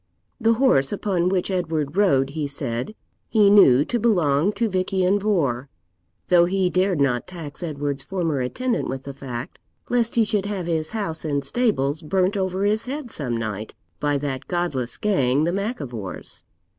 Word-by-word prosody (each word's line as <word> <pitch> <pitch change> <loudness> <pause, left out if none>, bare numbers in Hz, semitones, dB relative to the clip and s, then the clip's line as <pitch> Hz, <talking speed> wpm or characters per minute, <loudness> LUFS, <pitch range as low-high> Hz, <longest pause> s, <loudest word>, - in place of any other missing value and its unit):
The 225 -1 +3
horse 180 - +3
upon 185 -4 0
which 185 0 0
Edward 160 -5 -1
rode, 140 -10 +3
he 150 -1 -2
said, 135 - -2 0.3
he 210 -3 +5
knew 145 -9 +7
to 240 - -1
belong 175 -6 +2
to 230 - 0
Vich 185 -2 -1
Ian 190 +1 +2
Vohr, 140 - 0 0.6
though 175 -1 +6
he 185 0 +1
dared 185 -2 +1
not 125 -4 +1
tax 165 -5 -8
Edward's 145 -4 -3
former 165 -4 -2
attendant 240 - -1
with 135 0 -4
the 140 - -7
fact, 125 -3 -7 0.3
lest 235 -1 +1
he 230 - +5
should 210 -2 0
have 195 -4 -3
his 160 +1 -1
house 195 -8 -2
and 145 -3 -1
stables 155 - 0
burnt 185 +5 +1
over 190 0 -1
his 215 +3 +1
head 275 -2 -5
some 125 -6 -2
night 110 -1 -5 0.2
by 145 -1 +1
that 135 -2 -4
godless 160 -9 -2
gang, 145 -9 +2
the 170 - +1
Mac 205 +6 -2
Ivors. 115 -9 -7
170 Hz, 170 wpm, -23 LUFS, 140-200 Hz, 0.6 s, knew